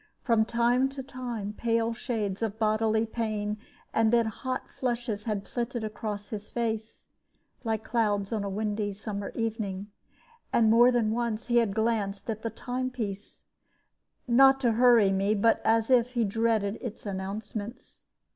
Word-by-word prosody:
From 230 -3 +3
time 240 +3 +2
to 265 - -4
time 245 -6 -5
pale 230 0 +1
shades 215 -4 -3
of 220 -2 -2
bodily 220 0 +2
pain, 215 -2 -2 0.3
and 225 -1 +3
then 235 -1 +4
hot 255 +4 -4
flushes, 235 -4 -2
had 210 -3 -2
flitted 240 -1 -3
across 210 -1 -5
his 210 -1 -6
face, 220 -2 -3 0.6
like 220 -2 -1
clouds 210 -3 0
on 215 -2 -1
a 200 - -2
windy 205 0 -2
summer 200 0 -5
evening. 210 -3 -3 0.6
And 225 -2 +4
more 240 +2 +7
than 230 -3 +2
once 235 -1 -1
he 240 -1 +2
had 225 -4 +2
glanced 220 -2 0
at 215 0 -5
the 230 - -2
time 255 +2 -3
piece, 210 -5 -6 0.8
not 270 +2 +6
to 240 -3 +3
hurry 230 -3 +5
me, 195 +2 +2
but 225 +2 +3
as 225 +2 +2
if 250 0 +4
he 235 -2 +2
dreaded 220 -1 0
its 230 -3 -7
announcements. 205 +3 -6
225 Hz, 155 wpm, -28 LUFS, 210-235 Hz, 0.8 s, more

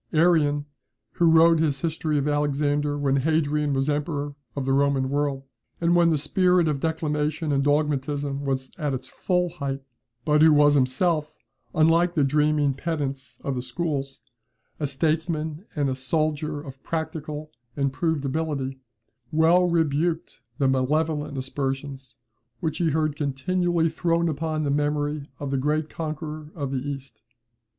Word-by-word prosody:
Arrian, 155 -3 +3 0.5
who 170 - +1
wrote 165 0 +6
his 145 -4 +1
history 155 -2 -1
of 140 0 0
Alexander 145 0 +1
when 140 -1 +1
Hadrian 150 0 +1
was 135 +1 0
emperor 145 -1 -1 0.2
of 140 - -2
the 135 - +1
Roman 135 -1 +2
world, 140 -1 0 0.4
and 170 +1 +3
when 170 -1 +5
the 160 - +2
spirit 180 +3 +3
of 150 -3 0
declamation 155 0 -1
and 140 -1 +2
dogmatism 145 -1 0
was 130 -1 -2
at 145 -3 0
its 130 - -6
full 180 -1 0
height, 140 -5 -4 0.4
but 150 0 +3
who 160 0 +7
was 145 0 +6
himself, 150 +4 +1 0.4
unlike 165 +3 +4
the 150 - +3
dreaming 150 0 +2
pedants 140 -2 -4
of 140 - -1
the 125 - -2
schools, 135 +1 -3 0.6
a 150 - 0
statesman 155 +3 -1
and 145 -2 +1
a 130 - 0
soldier 150 +3 -1
of 135 -2 -10
practical 155 -2 -4 0.3
and 140 -1 0
proved 155 -1 -1
ability, 135 -2 -2 0.5
well 170 +3 +4
rebuked 165 0 0 0.2
the 140 - +2
malevolent 150 +2 0
aspersions 135 0 -4 0.4
which 160 -2 -2
he 170 -2 +2
heard 155 -1 0
continually 165 +4 0
thrown 170 +1 +1
upon 155 0 -2
the 140 - 0
memory 145 0 -1
of 140 -1 -4
the 135 - +1
great 150 +3 0
conqueror 155 -1 -5
of 140 -5 -3
the 135 - -1
East. 135 -2 -7
150 Hz, 150 wpm, -25 LUFS, 140-160 Hz, 0.6 s, who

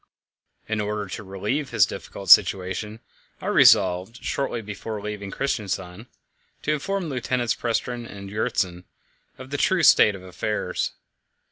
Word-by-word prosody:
In 110 -1 -1
order 105 0 -2
to 110 - -6
relieve 105 +9 -3
his 110 -5 +4
difficult 95 -1 -4
situation, 95 +4 +4 0.4
I - - -10
resolved, 95 +5 +4
shortly 135 -4 -2
before 105 +1 -6
leaving 105 -1 -6
Christiansand, 100 -4 -3 0.6
to 150 - +1
inform 190 +5 -2
Lieutenants 125 -3 -1
Prestrud 120 0 -3
and 100 -2 -9
Gjertsen 95 -3 -2 0.5
of 130 +1 -11
the 145 - -1
true 185 +3 +2
state 105 -8 +6
of 95 - -11
affairs. 95 0 -3
105 Hz, 130 wpm, -24 LUFS, 95-125 Hz, 0.6 s, state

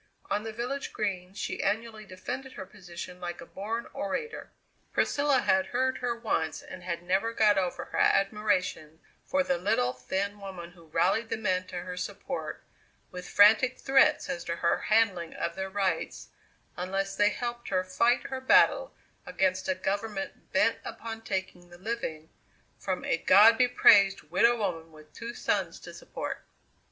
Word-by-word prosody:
On 205 - +1
the 225 +1 -5
village 250 +5 -4
Green 190 -3 -3
she - - -3
annually 215 +1 -2
defended 250 +8 -6
her 190 - -7
position 180 -2 -9
like 175 0 -5
a 170 - -9
born 220 +7 -4
orator. 455 - -4 0.4
Priscilla 285 -3 +2
had 190 0 +2
heard 260 +1 0
her 245 -1 -1
once 160 -9 -2
and 185 - -10
had 170 -1 -4
never 190 +6 +1
got 210 -2 +4
over 185 -2 -1
her - - -4
admiration 195 -6 +1 0.3
for 280 0 +2
the 180 -8 0
little, 125 -10 +1
thin 190 +11 -3
woman 185 -4 -8
who 170 -2 -18
rallied 220 +8 +1
the - - -1
men 185 -4 -1
to 175 -1 -5
her 180 0 -6
support 180 - -5 0.5
with 180 0 -8
frantic 220 +5 +5
threats 275 +3 +3
as 170 - -4
to 170 - -2
her 170 0 +1
handling 200 -7 +2
of 170 - -3
their 190 0 -4
rights 195 -1 -2 0.5
unless 195 +2 -2
they 205 +1 +4
helped 240 +1 -5
her 185 -2 +1
fight 185 +7 +2
her 260 0 -3
battle - - +4 0.3
against 190 -8 0
a 185 - +2
government 200 +1 -4
bent - - +3
upon 225 -1 -7
taking 190 -4 -4
the 175 - -13
living 175 -6 -5 0.5
from 185 -2 -3
a - - +1
"God 215 +6 +7
be 250 +1 +4
praised 200 -5 +5
widow 235 +1 +4
woman 165 -6 -3
with 155 -1 -17
two 235 +1 -7
sons - - -1
to - - -10
support." - - -6
195 Hz, 165 wpm, -29 LUFS, 180-230 Hz, 0.5 s, God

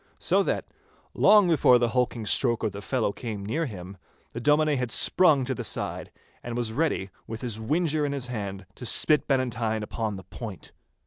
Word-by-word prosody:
So - - +2
that, - - -1 0.5
long 205 -2 +5
before 145 -7 +5
the 120 -1 +1
hulking 120 -2 -1
stroke 120 +2 +2
of 110 - 0
the 100 +1 -8
fellow 115 -1 -1
came 105 -3 -6
near 155 +10 -1
him, 95 -3 -9 0.4
the 115 - -4
Dominie 150 +2 +3
had 125 -2 -2
sprung 150 +1 +4
to 130 - -2
the - - -5
side, - - -5 0.3
and 120 0 -5
was 115 -2 -2
ready, 135 - -1 0.2
with 110 0 -6
his 115 -4 -3
whinger 155 +5 0
in 145 - -1
his 140 -3 -2
hand, 100 -5 -5
to 125 - -9
spit 150 +3 +3
Bannatyne 120 -5 0
upon 110 -1 -3
the 95 - -9
point. 95 0 -9
120 Hz, 190 wpm, -26 LUFS, 110-140 Hz, 0.5 s, long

